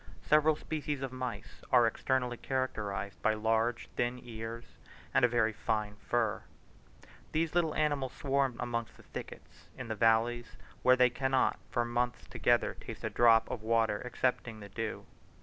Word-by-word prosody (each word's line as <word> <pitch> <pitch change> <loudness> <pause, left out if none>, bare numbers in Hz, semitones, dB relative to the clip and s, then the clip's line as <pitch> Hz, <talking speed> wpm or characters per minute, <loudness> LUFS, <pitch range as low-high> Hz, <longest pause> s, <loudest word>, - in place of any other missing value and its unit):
Several 155 +1 +4
species 150 -3 -4
of 135 - -3
mice 125 -5 -6
are 120 -2 +6
externally 125 +2 0
characterized 105 -7 -3
by 110 - +2
large 115 +2 0
thin 120 +1 0
ears 115 0 -6 0.5
and - - +4
a - - +8
very 115 -2 +2
fine 105 -1 -2
fur. 110 0 0 0.9
These 160 0 0
little 170 -3 +1
animals 145 -4 0
swarm 135 -2 0
amongst 115 -1 -3
the - - -16
thickets - - -10
in 130 -2 -6
the 110 - -1
valleys, 115 +2 +2 0.2
where 125 - +6
they 125 -1 +4
cannot 130 +1 +1
for 120 -1 0
months 120 +1 -1
together - - +1
taste - - -9
a - - -2
drop 115 -1 +5
of 115 - -4
water 110 -2 +1
excepting 125 -2 -1
the 100 -1 -10
dew. 115 +2 -4
120 Hz, 155 wpm, -32 LUFS, 115-130 Hz, 0.9 s, a